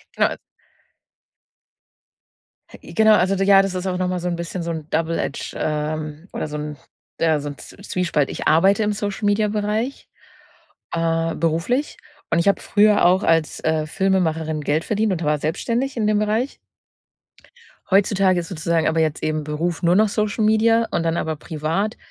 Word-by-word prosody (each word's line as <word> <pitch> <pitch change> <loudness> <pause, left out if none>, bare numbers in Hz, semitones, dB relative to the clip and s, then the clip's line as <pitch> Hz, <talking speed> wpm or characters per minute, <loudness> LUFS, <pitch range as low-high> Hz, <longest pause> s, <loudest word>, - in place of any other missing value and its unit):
Genau - - +3
e - - -11 2.4
I - - -12
genau 220 -1 +5
Also, 190 +1 +2
d 195 - 0
ja, 195 -1 +7
das 195 -1 -3
ist 185 +1 -3
auch 180 - -1
noch 185 0 0
mal 180 - -2
so 175 - -4
'n 175 - -1
bisschen 170 +1 -5
so 170 - -3
'n 160 -2 -6
Double 165 +1 0
Edge 140 - -4
ähm, 155 +2 -3
oder - - -3
so 150 0 -5
'n 150 0 -5 0.4
ja, 160 -2 +2
so 145 0 -5
'n 145 - -9
Zw - - -13
Zwiespalt. 175 -7 -1
Ich - - -3
arbeite 195 +7 +4
im 210 - +1
Social-Media-Bereich, 210 +3 -1 0.8
äh, 165 0 0
beruflich. 170 - -1 0.3
Und 165 - +3
ich 170 - 0
habe 200 - +3
früher 210 -1 +3
auch 185 +3 +4
als, 165 -1 +1
äh, 155 -1 0
Filmemacherin 160 -4 0
Geld 150 +3 0
verdient 215 -1 0
und 170 -2 -3
war 150 0 +1
selbstständig 235 - -2
in 215 -2 +1
dem 210 -1 +2
Bereich 220 +5 -1 1.3
Heutzutage 195 -1 +3
ist 165 - -10
sozusagen 165 -1 0
aber 160 +1 +1
jetzt 155 -1 0
eben 155 -1 -1
Beruf 160 +3 -2
nur 175 +1 +3
noch 215 0 +4
Social 215 +1 -1
Media 225 +1 +3
und - - 0
dann 165 0 0
aber 160 -2 -2
privat, 165 +8 -2
175 Hz, 175 wpm, -21 LUFS, 160-205 Hz, 2.4 s, ja